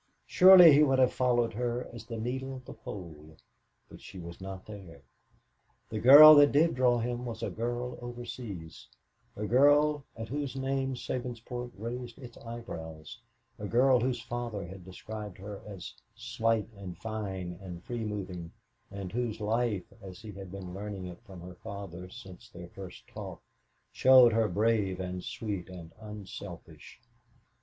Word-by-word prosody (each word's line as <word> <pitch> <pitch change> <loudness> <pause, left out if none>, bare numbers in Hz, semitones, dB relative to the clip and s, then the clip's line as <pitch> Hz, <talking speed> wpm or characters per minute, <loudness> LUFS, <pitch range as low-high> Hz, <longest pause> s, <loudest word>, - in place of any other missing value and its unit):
Surely 180 -3 +9
he 145 - +6
would 135 -3 +4
have 130 -1 +4
followed 120 -2 +1
her 120 +2 -2
as 115 -1 -10
the 115 -1 -5
needle 130 +3 -4
the - - -9
pole; 80 -5 -10 0.5
but - - -14
she - - -11
was 85 0 -9
not 95 0 -7
there. 95 -9 -11 0.9
The 110 - -2
girl 145 +6 +11
that 145 -1 +7
did 160 +4 +3
draw 125 -1 +3
him 120 +1 -3
was 115 -2 -6
a - - -2
girl 120 +2 -4
overseas, 120 -8 -8 0.5
a 105 - -4
girl 145 +4 +4
at 115 0 -5
whose 140 -1 -3
name 135 0 -1
Sabinsport 120 0 -5
raised 120 +2 -6
its 120 -4 -11
eyebrows, 100 -7 -8 0.4
a 105 - -4
girl 125 +3 +4
whose 125 0 -1
father 120 -4 -5
had 95 +1 -10
described 105 +1 -8
her 100 +1 -8
as 95 -4 -8 0.2
"slight 115 -2 0
and 95 -3 -8
fine 95 -5 -5
and 90 -2 -9
free 120 -2 -4
moving," 95 -5 -5 0.4
and 100 -2 -7
whose 120 -2 -2
life, 110 -2 0 0.2
as 95 -2 -10
he 110 -1 -9
had 95 -2 -10
been 95 -2 -8
learning 100 -1 -6
it 90 +3 -9
from 95 -3 -11
her 90 +1 -9
father 90 -1 -8
since 95 -5 -12
their 85 0 -11
first 95 -2 -11
talk, - - -8 0.5
showed 130 -3 +7
her 110 -1 +3
brave 105 -1 +1
and 90 -1 -4
sweet 100 -5 -5
and 85 -3 -10
unselfish. 100 -7 -10
110 Hz, 155 wpm, -30 LUFS, 95-125 Hz, 0.9 s, girl